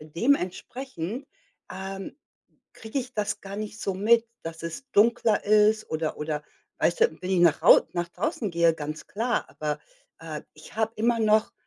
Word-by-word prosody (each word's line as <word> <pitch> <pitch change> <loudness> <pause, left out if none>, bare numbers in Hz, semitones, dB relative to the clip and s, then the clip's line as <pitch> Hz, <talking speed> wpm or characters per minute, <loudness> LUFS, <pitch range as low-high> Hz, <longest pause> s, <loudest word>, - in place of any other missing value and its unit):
Dementsprechend, 220 - -2 0.5
ähm, 195 +4 -6 0.6
kriege 225 +5 -5
ich 255 0 -5
das 210 -1 -1
gar 195 0 -7
nicht 215 0 -6
so 195 - -1
mit, 225 +4 +4 0.2
dass 165 0 -7
es 170 +12 -6
dunkler 225 0 +3
ist 215 +1 +4
oder 155 0 -2
oder 150 0 -3 0.4
weißt - - +1
du, 465 +1 +3
wenn 185 - -3
ich 185 -2 +3
nach 170 -3 +5
Hau - - +9
nach 175 -1 -2
draußen 230 - -2
gehe, 170 -1 +4
ganz 155 0 -6
klar, 235 +4 -1
aber, 150 -1 -3 0.4
äh, - - -6
ich - - -14
habe 220 0 +1
immer 230 +2 +2
noch 215 0 +3
205 Hz, 165 wpm, -26 LUFS, 170-230 Hz, 0.6 s, Hau